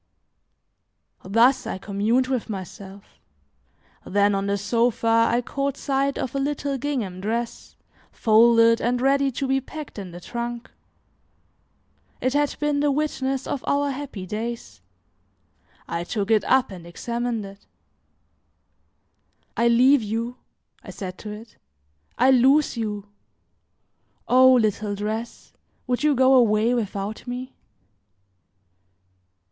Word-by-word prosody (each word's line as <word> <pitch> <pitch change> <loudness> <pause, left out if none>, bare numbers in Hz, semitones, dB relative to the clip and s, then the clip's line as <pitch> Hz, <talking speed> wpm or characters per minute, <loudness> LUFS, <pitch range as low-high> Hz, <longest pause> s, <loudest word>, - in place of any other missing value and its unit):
Thus, 230 +7 +3
I - - -3
communed 210 +6 0
with 255 -4 -3
myself; 195 0 -9 0.8
then 205 +1 +2
on 195 0 -1
the 200 0 0
sofa 230 +1 +2
I 240 +1 +1
caught 275 -1 -2
sight 275 0 -1
of 250 - -3
a 275 - -1
little 280 0 -2
gingham 235 -10 -3
dress, 230 +3 -4 0.4
folded 230 +1 +4
and 245 +1 0
ready 275 +1 +2
to 270 +2 -2
be 270 0 +1
packed 300 -3 -9
in 190 -2 -7
the 175 0 -10
trunk. 235 +4 -6 1.5
It 255 +1 0
had 290 0 +1
been 295 -1 0
the 290 0 +2
witness 270 -2 -1
of 275 - -4
our 285 0 +1
happy 265 -8 -6
days. 210 - -6 1.1
I 170 - -3
took 205 +3 -3
it 215 -2 +4
up 260 -3 +2
and 175 -3 -10
examined 235 +4 -3
it. 195 +1 -13 1.9
"I 235 - +2
leave 250 +3 +5
you!" 230 +3 -3 0.5
I - - -11
said 185 -2 -7
to 215 - -8
it; 215 +2 -11 0.6
"I 255 +2 +5
lose 265 +4 +4
you! 210 -3 -4 1.2
O 260 +1 +6
little 215 -4 +1
dress, 215 +3 -5 0.3
would 245 -1 -1
you 300 -1 +3
go 260 +1 +5
away 230 -2 +4
without 210 -1 -4
me?" 250 +1 -6
235 Hz, 125 wpm, -23 LUFS, 210-265 Hz, 1.9 s, O